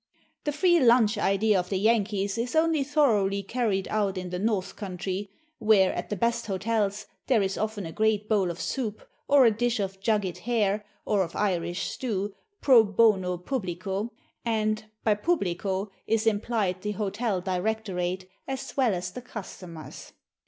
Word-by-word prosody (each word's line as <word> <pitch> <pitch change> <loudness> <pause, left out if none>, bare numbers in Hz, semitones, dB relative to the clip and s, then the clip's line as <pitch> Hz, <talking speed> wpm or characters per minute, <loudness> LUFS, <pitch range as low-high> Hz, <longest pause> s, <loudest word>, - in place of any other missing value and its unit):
The 295 - +1
"free 345 +3 +4
lunch" 235 -4 +5
idea 200 0 +3
of 180 0 -4
the 195 - 0
Yankees 205 -1 +1
is 245 +5 -2
only 320 -2 +3
thoroughly 220 -9 +2
carried 200 -3 -1
out 205 -3 0
in 180 -1 -5
the 180 - -3
"North 205 -2 -1
Countree," 190 0 -4 0.3
where, 210 -4 +4
at - - -4
the 210 - -1
best 235 +4 0
hotels, 210 +1 -1 0.2
there 230 -6 +4
is 195 0 -1
often 215 -2 -3
a 165 - -6
great 215 +1 +1
bowl 200 -5 +2
of 170 +1 -5
soup, 220 -6 -3 0.2
or 280 -2 +6
a 230 - +6
dish 240 +2 0
of 195 -1 -3
jugged 200 -3 0
hare, 210 -4 0 0.2
or 205 -2 +2
of 170 -3 -3
Irish 175 -3 0
stew, 205 -5 -3 0.3
pro 250 -5 +7
bono 200 -4 +3
publico; 195 0 -3 0.3
and 215 -1 0 0.2
by 215 - +4
publico 200 - -1 0.2
is 225 0 +1
implied 210 -4 0
the 210 +1 -2
hotel 205 0 -1
directorate 185 -1 -2 0.2
as 265 -1 -5
well 250 -7 +3
as 180 0 -4
the 250 - -7
customers. 185 -8 -9
210 Hz, 160 wpm, -27 LUFS, 190-230 Hz, 0.3 s, pro